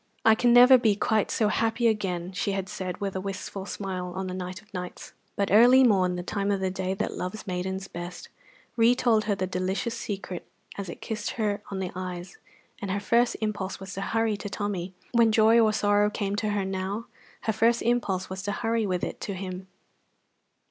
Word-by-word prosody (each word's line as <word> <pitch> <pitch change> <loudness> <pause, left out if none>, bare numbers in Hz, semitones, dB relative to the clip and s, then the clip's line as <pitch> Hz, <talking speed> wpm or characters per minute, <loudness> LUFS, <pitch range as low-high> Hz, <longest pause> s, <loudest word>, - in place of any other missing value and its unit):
"I 220 - +8
can 240 +2 +3
never 250 +2 +9
be 220 -4 +3
quite 215 +1 +1
so 215 -2 +1
happy 225 +2 +1
again!" 185 -5 -1
she 200 +1 -1
had 195 -1 -2
said, 185 -3 -5
with 195 -1 -3
a 190 - -2
wistful 195 0 -5
smile, 185 -3 -4
on 190 0 -3
the 185 - -4
night 185 0 -5
of 210 0 -23
nights; 180 -1 -7 0.2
but 200 -2 0
early 245 +5 +7
morn, 185 -6 +3
the 175 - -4
time 200 +2 -2
of 200 -1 +1
the 190 -1 -1
day 190 0 -2
that 210 - -2
loves 185 +5 -5
maidens 190 +1 -3
best, 175 0 -7 0.5
retold 230 -1 +3
her 205 -1 +1
the 185 - -1
delicious 190 +5 -2
secret 195 -5 -5 0.3
as 195 -3 -5
it - - -8
kissed 215 -2 -3
her 210 -2 0
on 195 - -4
the 185 -2 -3
eyes, 180 - -6 0.4
and 200 - -4
her 200 +2 0
first 235 +4 +2
impulse 205 -3 -3
was 190 0 -8
to 195 - -4
hurry 225 +1 0
to 205 - -6
Tommy. 195 -3 -3 0.2
When 235 -2 +4
joy 220 +1 +5
or 220 -2 +5
sorrow 205 -1 +3
came 205 -1 -2
to 215 0 0
her 205 -2 0
now, 190 +4 -3 0.4
her 220 - 0
first 230 +2 +2
impulse 215 -6 0
was 190 0 -5
to 205 +1 -2
hurry 225 0 0
with 180 -2 -1
it - - -4
to 200 - -4
him. 185 0 -6
200 Hz, 205 wpm, -27 LUFS, 185-220 Hz, 0.5 s, never